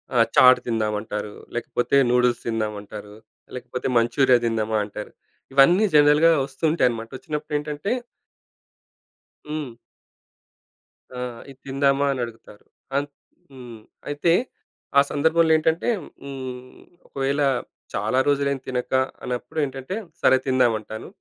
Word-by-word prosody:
ఆహ్, 115 -2 +5
చాట్ 130 0 +8
తిందాం 110 -2 0
అంటారు. 105 -1 -5 0.2
లేకపోతే 120 +2 -1 0.2
నూడిల్స్ 125 -1 +2
తిందాం 110 -2 -1
అంటారు, 105 0 -10 0.4
లేకపోతే 125 0 -5
మంచూరియా 125 +2 +4
తిందామా 110 -1 0
అంటారు. 105 +1 -8 0.4
ఇవన్నీ 170 +10 +6
జనరల్‌గా 150 +3 +6
వస్తూ 135 +2 -17
ఉంటాయన్నమాట. 120 -7 0
వచ్చినప్పుడు 150 -5 -6
ఏంటంటే 150 +5 -4 1.6
హ్మ్. 150 -5 -4 1.4
ఆ! - - -4 0.3
ఇది 135 -1 -14
తిందామా 140 +1 +2
అని 135 - -3
అడుగుతారు. 115 -2 -14 0.3
ఆ! - - +4 0.5
హ్మ్ 120 -4 -11 0.3
అయితే 145 +3 +2 0.7
ఆ - - +8
సందర్భంలో 160 +2 +3
ఏంటంటే 160 +1 0 0.4
హ్మ్, 130 -2 -8 0.3
ఒకవేళ 140 +1 -1 0.5
చాలా 130 - 0
రోజులు 140 -1 +2
ఏం 135 - -5
తినక 125 0 -3 0.3
అన్నప్పుడు 125 +4 -4
ఏంటంటే 135 +5 -6 0.3
సరే 130 - +5
తిందాం 130 -3 +3
అంటాను. 110 +1 -9
130 Hz, 115 wpm, -23 LUFS, 115-145 Hz, 1.6 s, చాట్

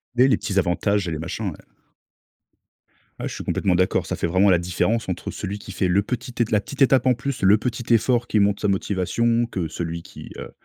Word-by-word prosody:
Les 125 +2 +5
les 135 - +3
petits 100 - -3
avantages 95 +2 0
et - - -2
les 80 - -3
machins, 80 - -3
ouais. - - -11 1.6
Ouais, - - -3
je - - -6
suis - - -6
complètement 90 -2 0
d'accord, 90 +1 +1
ça - - -3
fait - - -1
vraiment 95 +4 +3
la 90 - +5
différence 95 +5 -1
entre 90 - -4
celui 100 +1 -5
qui 100 - -9
fait 95 0 0
le 95 +3 +3
petit 125 +4 -4
ét 115 - +1
la 105 -2 +3
petite 140 +5 -9
étape 135 0 +5
en 130 - +5
plus, 135 +2 -4
le 100 +3 +6
petit 120 +1 -2
effort 120 +1 +2
qui 110 - +2
montre 100 0 +2
sa 105 - +1
motivation 110 +5 +1
que 95 -7 -3
celui 85 +1 -5
qui, - - -11
heu, - - -8
100 Hz, 230 wpm, -23 LUFS, 90-120 Hz, 1.6 s, le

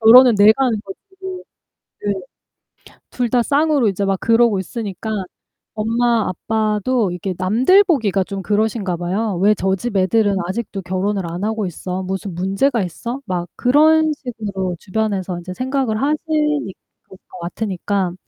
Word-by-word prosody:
'결혼은 240 +2 +8
내가 215 +6 +6
하는 230 -4 +1
거지.' 195 -1 -9 1.1
네. 205 - +1 1.0
둘 245 -2 -1
다 245 +1 +3
쌍으로 290 -2 +2
이제 200 0 -1
막 195 -1 0
그러고 230 -3 +3
있으니까 205 +1 -5 0.7
엄마 230 0 +1
아빠도 215 +3 0
이렇게 180 +2 -4
남들 245 - +4
보기가 225 - +1
좀 195 0 -5
그러신가 210 -2 0
봐요. 190 +3 -2
'왜 210 +2 +5
저 190 0 0
집 210 +1 -3
애들은 200 +1 +2
아직도 200 0 -4
결혼을 190 +2 -1
안 175 +3 -5
하고 220 0 -1
있어? 180 +1 -4
무슨 190 -1 -4
문제가 195 +6 +1
있어?' 235 - -5
막 175 -3 -3
그런 310 +4 +4
식으로 205 -9 -4
주변에서 195 -3 -2
이제 185 +1 -7
생각을 255 -1 -1
하시니 300 - 0 0.3
그럴 190 - -15
것 - - -11
같으니까 190 0 -2
210 Hz, 310 characters per minute, -19 LUFS, 190-240 Hz, 1.1 s, 결혼은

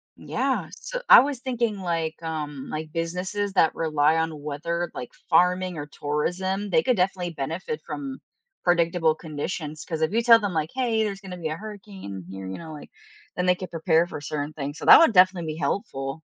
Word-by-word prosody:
Yeah, - - -2
so - - -6
I - - +12
was 280 -2 0
thinking, 240 -5 -1
like, 165 -3 -2
um, 150 -4 -5
like, 155 0 -5
businesses 180 +5 -2
that 165 -4 +3
rely 155 -1 +2
on 160 -2 -2
weather, 170 +4 -3
like, 125 - -6 0.2
farming 180 +1 +3
or 145 - -4
tourism, 180 +8 -2
they 240 - +4
could 255 0 +2
definitely 180 -2 -1
benefit 165 - -4
from 270 -2 -6 0.4
predictable 170 -2 +3
conditions 155 0 -5
'cause 160 -2 -4
if 160 - +1
you 230 +2 +2
tell 230 -1 +7
them, 205 -4 -2
like, 155 -1 -1
hey, 240 -4 +1
there's 200 -2 -3
gonna 185 -3 -8
be 165 -3 -3
a 155 - -3
hurricane 195 - -9
here, 95 0 -7
you 95 - -5
know, 160 -2 -9
like, 150 - -10 0.5
then 180 - -1
they 180 0 +4
could 185 0 -7
prepare 165 0 +2
for 175 - -6
certain 145 +1 -4
things, 145 0 -5
so - - -6
that - - +10
would 330 -8 +5
definitely 180 -4 +4
be - - -9
helpful. 135 -5 -3
170 Hz, 195 wpm, -25 LUFS, 155-195 Hz, 0.5 s, I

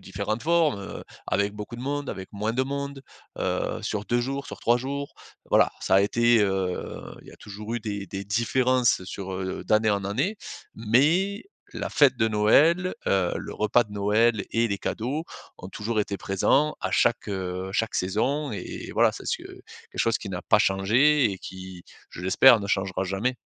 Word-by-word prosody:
différentes 110 +2 -4
formes, 160 -8 +2
heu, 100 - -8 0.2
avec 100 +1 +1
beaucoup 105 +3 -7
de - - -8
monde, 145 0 -3
avec 95 0 -7
moins 105 +2 -2
de 130 +2 0
monde, 140 0 -5 0.4
heu, - - -1
sur 105 -1 -3
2 120 0 +1
jours, 135 +3 -3
sur - - -8
3 120 +1 +3
jours. 140 +3 -5 0.3
Voilà, - - +5
alors - - -13
ça 95 - +2
a 95 - +7
été, 120 +3 +3
heu, 95 -3 -1 0.2
il - - -18
y - - -9
a - - -15
toujours 105 +2 -7
eu 120 - 0
des 100 -2 -5
des 95 +2 -5
différences 120 +1 +1
sur, 95 0 -6
heu, 95 0 -4
d'année 110 0 +3
en 100 -1 0
année. 135 - -1 0.4
Mais, 155 - +2 0.3
la - - -4
fête 135 -4 +4
de 110 -2 +2
Noël, 150 +13 +3
heu, 95 -3 +2
le - - -7
repas 110 +3 +2
de 105 - -15
Noël 105 +2 +2
et 115 0 +2
les 100 -2 -2
cadeaux 130 +11 -3 0.5
toujours 110 0 -2
été 100 -1 -3
présents 135 +12 +1
à - - -2
chaque, 120 -2 +1
heu, 95 -1 -4
chaque 110 +3 -1
saison. 130 +10 0
Et 100 -4 -6
voilà - - +3
c'est - - -9
ce - - 0
que - - -12
quelque - - -12 0.4
chose 115 -1 +2
qui 100 - -8
n'a 90 -2 -5
pas 105 - +4
changé 115 +8 +3
et 95 - -6
qui, 95 -1 -10 0.3
je 90 - -9
l'espère, 115 +6 +6
ne 100 - -5
changera 95 -1 -1
jamais. 100 +7 -1
110 Hz, 195 wpm, -25 LUFS, 100-130 Hz, 0.5 s, a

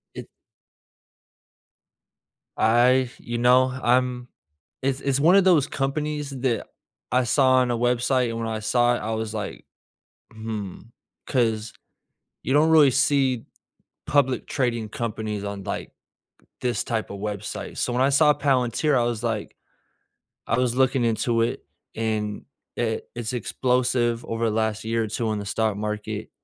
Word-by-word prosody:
it - - -8 2.3
I 120 +3 +4
you 120 0 -4
know, 125 +2 +5 0.2
I'm 125 0 +1 0.5
it's 135 0 -1
it's 140 -1 0
one 170 +6 +5
of 195 - +6
those 170 -7 +4
companies 150 +1 -2
that 130 -3 -2 0.4
I 125 0 +3
saw 130 +1 +3
on 125 -1 +2
a 120 - 0
website, 125 +1 +1
and 115 0 -4
when 115 - -2
I 110 -1 -3
saw 120 +3 +2
it, - - -3
I 110 - -4
was 110 -1 -3
like, 105 -2 -5 0.7
"Hmm." 110 -4 -6 0.5
'Cause, 115 -4 0 0.7
you 130 - -2
don't 155 +2 +4
really 150 -4 +7
see 135 -2 +2 0.6
public 135 -3 +1
trading 120 -6 -1
companies 110 -2 -4
on, 100 -1 -5
like, - - -5 0.7
this 125 -1 -1
type 115 -2 -3
of 100 - -7
website, 105 0 -5
so - - -1
when 125 - +1
I 135 - +4
saw 150 +2 +5
Palantir, 135 0 +1
I 120 - +2
was 120 -1 -2
like 110 -3 -3 0.9
I 120 - +1
was 125 -2 +1
looking 130 -1 +2
into 115 +1 +1
it, 115 - -2 0.3
and, 110 -2 -2 0.3
it 110 -2 -2
it's 120 0 -3
explosive 120 0 0
over 115 0 -2
the 105 - -3
last 110 -1 -1
year 115 0 0
or - - -4
two 110 +1 -2
in 105 - -2
the 100 - -7
stock 110 0 0
market. 105 0 -4
120 Hz, 150 wpm, -24 LUFS, 110-130 Hz, 2.3 s, really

